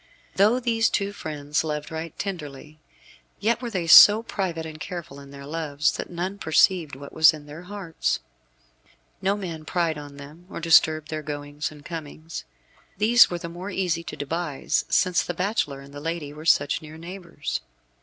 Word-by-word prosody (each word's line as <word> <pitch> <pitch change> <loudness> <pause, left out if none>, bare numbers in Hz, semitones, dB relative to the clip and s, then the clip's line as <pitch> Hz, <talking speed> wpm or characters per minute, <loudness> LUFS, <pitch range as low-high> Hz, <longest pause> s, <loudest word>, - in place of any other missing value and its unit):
Though 215 +6 +4
these 230 -2 +2
two 200 0 -1
friends 150 -4 -3
loved 150 -1 -4
right 160 0 -6
tenderly, 155 -5 -6 0.6
yet 230 +3 +1
were 240 - -3
they 185 -6 -2
so 205 +6 +9
private 175 -7 -3
and 155 -1 -8
careful 170 -5 -7
in 140 0 -12
their 140 0 -10
loves 150 -1 0
that - - -6
none 185 +3 -4
perceived 160 -2 +3
what 140 +1 -11
was 160 0 +6
in 150 -1 -12
their 150 +3 -10
hearts. 180 -3 -2 1.0
No 200 +2 +1
man 170 -6 -6
pried 165 -1 -1
on 145 -1 -10
them, 150 +5 -12
or - - -6
disturbed 155 -2 +4
their 155 -1 -3
goings 145 0 -5
and 150 -1 -14
comings. 160 -1 -7 0.5
These 230 +4 +6
were 175 - -3
the 170 - -6
more 175 +4 -7
easy 180 -3 -1
to - - -6
devise 155 0 -2
since 180 -1 +3
the 175 - -4
bachelor 180 -7 -1
and 140 0 -14
the 145 - -7
lady 165 -2 -4
were 155 +1 -10
such 145 -3 +3
near 155 0 -11
neighbours. 170 -2 -5
165 Hz, 175 wpm, -25 LUFS, 150-185 Hz, 1.0 s, so